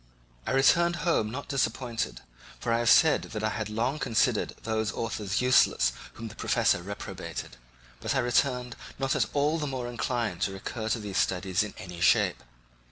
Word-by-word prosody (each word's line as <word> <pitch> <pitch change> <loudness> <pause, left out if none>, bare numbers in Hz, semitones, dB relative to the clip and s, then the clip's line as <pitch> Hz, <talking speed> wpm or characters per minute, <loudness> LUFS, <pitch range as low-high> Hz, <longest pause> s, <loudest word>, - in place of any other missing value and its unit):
I - - 0
returned 170 +6 +4
home 160 -11 +2
not 135 +6 -6
disappointed, 115 - -2 0.4
for 115 - -1
I 115 - +2
have 120 0 +2
said 160 -2 +6
that 110 -1 -6
I 110 - +2
had 110 -1 -3
long 120 +7 -1
considered 115 -7 +1
those 110 -1 -1
authors 105 -2 -2
useless 125 - +4 0.2
whom 115 - -7
the 110 - -9
professor - - +1
reprobated; 100 -8 -7 0.4
but - - -2
I - - +3
returned 125 0 +1 0.2
not 135 0 0
at 125 -7 +2
all 150 +3 +1
the 150 - -2
more 130 -3 -3
inclined 120 -5 -2
to 95 - 0
recur 110 +3 -5
to 115 - 0
these 100 -3 -2
studies 95 +2 +1
in 105 -1 -4
any 90 -5 -8
shape. - - +3
115 Hz, 175 wpm, -28 LUFS, 105-130 Hz, 0.4 s, said